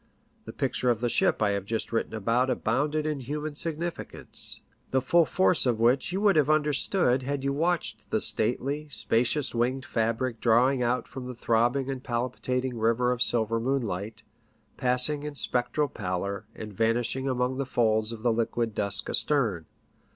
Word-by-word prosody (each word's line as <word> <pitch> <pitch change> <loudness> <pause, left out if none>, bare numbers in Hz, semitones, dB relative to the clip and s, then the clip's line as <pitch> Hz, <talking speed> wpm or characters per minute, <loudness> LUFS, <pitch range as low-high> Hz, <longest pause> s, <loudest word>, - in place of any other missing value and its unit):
The - - -7
picture 125 - -1
of 120 -2 +1
the 120 0 0
ship 110 - +2
I 105 - +2
have 100 -1 -2
just 110 +3 -3
written 115 -1 -2
about 115 +5 +1
abounded 145 +6 0
in 150 -2 -2
human 150 +4 -4
significance, 165 +3 -2 0.3
the 130 - +2
full 165 +6 +3
force 185 -6 +3
of 120 -3 +1
which 125 +6 +2
you 190 - -1
would 205 -2 +4
have 150 -1 +3
understood 150 -2 +2
had 140 +1 -3
you 140 0 0
watched 170 +3 -2
the - - +1
stately, 140 +7 +2
spacious 125 +2 0
winged 125 +3 -1
fabric 115 +1 -1
drawing 125 +3 +3
out 125 +1 0
from 130 -2 -8
the 125 - -7
throbbing 120 +3 +1
and 130 -1 -6
palpitating 125 0 -2
river 115 +2 +2
of 125 -1 -2
silver 115 -2 +1
moonlight, 110 -4 -3 0.5
passing 125 +3 +2
in 150 0 -6
spectral 130 +3 0
pallor, 100 -1 -4
and 105 -1 -8
vanishing 120 +5 0
among 125 0 -1
the 140 - -1
folds 110 -3 +2
of 110 -2 -8
the 120 -2 +2
liquid 115 0 -1
dusk 100 -1 0
astern. 110 - 0
125 Hz, 165 wpm, -27 LUFS, 115-140 Hz, 0.5 s, would